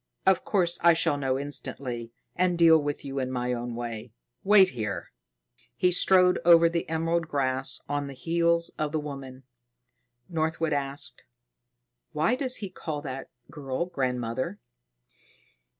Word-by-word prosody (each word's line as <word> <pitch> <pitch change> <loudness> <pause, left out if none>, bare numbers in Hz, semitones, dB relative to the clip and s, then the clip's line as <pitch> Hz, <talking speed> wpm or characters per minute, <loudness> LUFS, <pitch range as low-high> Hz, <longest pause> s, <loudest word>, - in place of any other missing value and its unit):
Of 190 -1 +4
course 175 -4 +1
I 170 0 +7
shall 160 - +2
know 135 -2 -1
instantly 130 -4 -3 0.2
and 180 -1 +1
deal 165 -1 +7
with 145 -1 -4
you 135 0 -3
in 130 -1 -2
my 125 -1 -1
own 120 0 -4
way. 115 -1 -6 0.3
Wait 195 -1 +6
here." 105 - -5 0.6
He 180 - +2
strode 180 0 +4
over 170 -1 +7
the 170 -1 -2
emerald 165 +1 0
grass 135 -2 -1
on 145 0 -2
the 140 - -8
heels 170 +3 +1
of 155 0 -1
the 155 - +1
woman. 135 -3 -8 0.8
Northwood 160 -1 -1
asked: 140 0 -4 0.9
"Why 155 +10 +2
does 255 0 0
he 200 -3 -5
call 155 -5 -5
that 135 -2 -6 0.2
girl 140 +1 -3
grandmother?" 130 - -2
150 Hz, 140 wpm, -27 LUFS, 130-170 Hz, 0.9 s, I